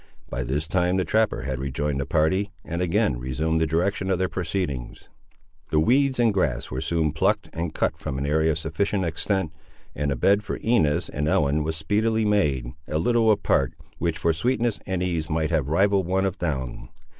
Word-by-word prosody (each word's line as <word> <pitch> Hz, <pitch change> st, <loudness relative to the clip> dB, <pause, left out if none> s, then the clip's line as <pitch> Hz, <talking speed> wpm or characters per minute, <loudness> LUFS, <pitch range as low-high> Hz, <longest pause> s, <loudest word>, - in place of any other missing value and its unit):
By -, -, -2 dB
this 70 Hz, +5 st, -2 dB
time 90 Hz, +1 st, +1 dB
the 95 Hz, -, +1 dB
trapper 110 Hz, -1 st, +1 dB
had 65 Hz, -2 st, -3 dB
rejoined 70 Hz, +1 st, -2 dB
the 65 Hz, -, -4 dB
party, 95 Hz, +6 st, +1 dB
and 85 Hz, +2 st, -3 dB
again 85 Hz, -8 st, +1 dB
resumed 75 Hz, +6 st, -1 dB
the 80 Hz, -, +2 dB
direction 95 Hz, +5 st, 0 dB
of 95 Hz, -, +2 dB
their 95 Hz, +1 st, +1 dB
proceedings. 85 Hz, -8 st, -3 dB, 0.6 s
The 75 Hz, -, +2 dB
weeds 130 Hz, -, +3 dB
and 115 Hz, -3 st, +4 dB
grass 65 Hz, -10 st, -1 dB
were 65 Hz, +1 st, -3 dB
soon 80 Hz, -2 st, 0 dB
plucked 100 Hz, +6 st, 0 dB
and 85 Hz, -1 st, -3 dB
cut -, -, -1 dB
from 65 Hz, -, -4 dB
an 70 Hz, -, -2 dB
area 80 Hz, +2 st, +2 dB
of -, -, -3 dB
sufficient 100 Hz, +4 st, -1 dB
extent, 85 Hz, +1 st, -1 dB, 0.4 s
and 70 Hz, 0 st, -1 dB
a -, -, 0 dB
bed 100 Hz, +11 st, +3 dB
for 105 Hz, -, -4 dB
Inez 110 Hz, -11 st, +1 dB
and 75 Hz, +2 st, -2 dB
Ellen 75 Hz, -1 st, +2 dB
was 80 Hz, +1 st, -2 dB
speedily 110 Hz, +7 st, +1 dB
made, 70 Hz, -12 st, +1 dB
a 75 Hz, -, -1 dB
little 115 Hz, +6 st, +3 dB
apart, 100 Hz, -, +2 dB, 0.2 s
which 85 Hz, -2 st, -1 dB
for 80 Hz, +1 st, +1 dB
sweetness 120 Hz, +5 st, 0 dB
and 95 Hz, -2 st, -1 dB
ease 85 Hz, -4 st, -2 dB
might 80 Hz, +1 st, 0 dB
have 75 Hz, -4 st, +1 dB
rivalled 95 Hz, +2 st, +2 dB
one 95 Hz, +1 st, +1 dB
of 95 Hz, +1 st, -2 dB
down. 65 Hz, -7 st, -3 dB
80 Hz, 195 wpm, -25 LUFS, 75-100 Hz, 0.6 s, and